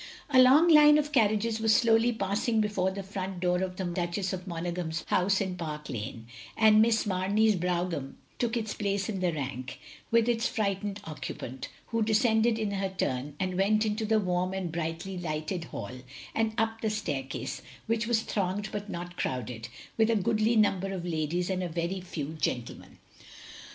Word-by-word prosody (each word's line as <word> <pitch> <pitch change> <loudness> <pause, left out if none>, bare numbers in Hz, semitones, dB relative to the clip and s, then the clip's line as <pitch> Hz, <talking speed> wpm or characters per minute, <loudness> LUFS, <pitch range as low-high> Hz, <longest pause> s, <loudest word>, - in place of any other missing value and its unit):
A 255 -1 +7
long 275 +7 +7
line 300 -2 +8
of 295 0 0
carriages 220 -3 +2
was 220 -1 +4
slowly 230 0 +4
passing 220 +1 0
before 210 -3 +1
the 195 +1 -5
front 190 -1 -5
door 180 0 +1
of 185 -1 -2
the 190 - -4
Duchess 175 +2 -2
of 185 0 -6
Monaghan's 170 -1 -3
house 190 +1 +3
in 190 -2 -2
Park 150 -3 -6
Lane, 110 0 -5 0.3
and 215 -1 +6
Miss 225 0 +3
Mamey's 205 +3 +2
brougham 175 -5 -2 0.2
took 240 -1 0
its 220 -2 -2
place 200 0 -1
in 200 -3 -2
the 180 -1 +1
rank, 135 -4 -5 0.3
with 230 0 +3
its 230 -1 +2
frightened 205 -1 -2
occupant; 130 -5 -6 0.2
who 230 -1 0
descended 220 +1 +3
in 215 -2 -1
her 195 -1 -1
turn, 145 -6 -2
and 185 -1 -1
went 215 +3 +3
into 215 +1 -1
the 220 0 +3
warm 180 -1 0
and 185 -3 -3
brightly 165 +3 -4
lighted 165 +1 -3
hall, - - -6 0.4
and 225 -1 0
up 225 0 0
the 220 - 0
staircase, 145 -10 -3 0.2
which 230 0 0
was 230 -2 +2
thronged 200 +1 -2
but 205 0 -5
not 175 +1 -6
crowded, 120 -2 -3 0.3
with 220 0 +4
a 230 - +3
goodly 215 +2 +2
number 195 -3 +2
of 185 -3 -4
ladies 170 +1 -1
and 185 -1 -1
a 180 - -2
very 170 +3 -2
few 155 -5 -5
gentlemen. 120 -2 -3
195 Hz, 175 wpm, -29 LUFS, 175-220 Hz, 0.4 s, line